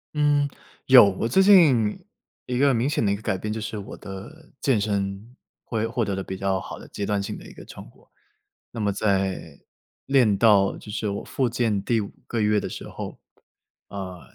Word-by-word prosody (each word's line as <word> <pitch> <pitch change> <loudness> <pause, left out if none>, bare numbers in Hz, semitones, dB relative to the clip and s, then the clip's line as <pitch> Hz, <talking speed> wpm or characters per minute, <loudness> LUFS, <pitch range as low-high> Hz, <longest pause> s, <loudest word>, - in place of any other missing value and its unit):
嗯， 145 -1 +3 0.4
有。 125 -6 +8
我 100 +4 -2
最 160 +11 +3
近 150 - +5 0.5
一 125 -1 -2
个 140 0 +5
明 120 +2 +1
显 150 - 0
的 100 - +2
一 - - +1
个 100 - -10
改 95 - 0
变， 105 +3 -4
就 110 - -3
是 110 0 -5
我 100 - -9
的 105 +11 -10
健 130 -6 +2
身， 100 +3 -3 0.3
会 115 -1 -2
获 115 -1 -1
得 100 - -2
了 95 - -4
比 95 0 -6
较 95 -1 -1
好 - - -8
的 - - -12
阶 100 - -6
段 100 0 0
性 - - -5
的 - - -11
一 - - -12
个 - - -12
成 - - -11
果。 - - -25 0.6
那 - - -7
么 105 -2 +1
在 95 -6 -1 0.5
练 125 -7 +3
到 100 -3 +4
就 105 - -10
是 105 0 -2
我 100 - -4
复 130 -3 -1
健 115 -5 0
第 115 0 +1
5 100 - -5 0.2
个 115 - -2
月 105 0 +3
的 - - -5
时 - - -8
候， - - -8 0.7
呃， 95 -3 -7
105 Hz, 220 characters per minute, -24 LUFS, 100-125 Hz, 0.7 s, 有